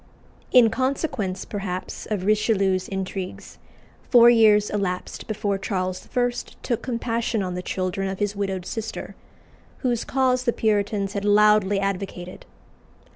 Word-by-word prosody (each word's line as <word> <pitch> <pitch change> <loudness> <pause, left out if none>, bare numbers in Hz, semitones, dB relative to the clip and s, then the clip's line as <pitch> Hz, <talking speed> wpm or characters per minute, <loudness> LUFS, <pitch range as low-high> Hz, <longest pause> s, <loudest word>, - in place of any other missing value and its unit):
In 235 -3 +6
consequence, 250 - -2
perhaps, 190 -3 -5
of 200 -4 -2
Richelieu's 200 -3 +2
intrigues, 190 -1 -5 0.5
four 240 -1 +8
years 215 -3 +5
elapsed 195 -3 -3
before 205 -2 -1
Charles 185 -2 -3
I. 245 0 +3 0.3
took 235 - -1
compassion 230 -3 -1
on 180 -1 -3
the 180 - -3
children 185 +1 -2
of 190 - -4
his 205 0 -1
widowed 195 -2 -3
sister, 225 +2 -5 0.7
whose 240 -2 +1
cause 255 -1 +1
the 235 - +2
Puritans 205 -2 0
had 200 - -3
loudly 205 -1 +4
advocated. 195 -2 -4
205 Hz, 130 wpm, -24 LUFS, 190-225 Hz, 0.7 s, four